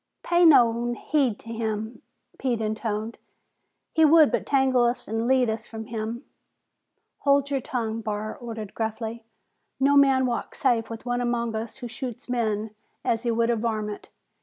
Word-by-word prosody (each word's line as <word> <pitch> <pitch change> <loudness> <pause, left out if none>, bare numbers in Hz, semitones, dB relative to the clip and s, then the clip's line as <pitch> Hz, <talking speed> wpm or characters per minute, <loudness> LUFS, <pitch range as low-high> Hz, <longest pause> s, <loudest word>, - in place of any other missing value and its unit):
"Pay 345 0 +4
nao 240 -5 +5
heed 260 -4 0
to 230 - -12
him!" 220 0 -3 0.4
Pete 245 -4 0
intoned. 220 0 -3 0.7
"He 320 - +4
would 310 -1 +7
but - - -1
tangle 265 -3 +3
us 240 +1 0
an' 225 +2 -1
lead 260 -1 +4
us 220 +1 -3
from 220 -1 -7
him." 225 +3 -5 0.9
"Hold 280 0 +2
your 275 -2 0
tongue!" 230 -3 -3
Barr 215 0 -3
ordered 225 -4 -7
gruffly. 225 +1 -4 0.6
"No 280 +1 +4
man 270 -2 +5
walks 240 -2 -3
safe 235 -4 +2
with 230 +1 -8
one 245 0 -1
among 235 -1 -1
us 220 +1 -4
who 250 -2 -7
shoots 245 0 -7
men 220 -3 -1 0.3
as 225 -1 +1
he 240 - -1
would 230 0 +2
a - - +2
varmint! 215 -2 -3
235 Hz, 160 wpm, -25 LUFS, 220-255 Hz, 0.9 s, would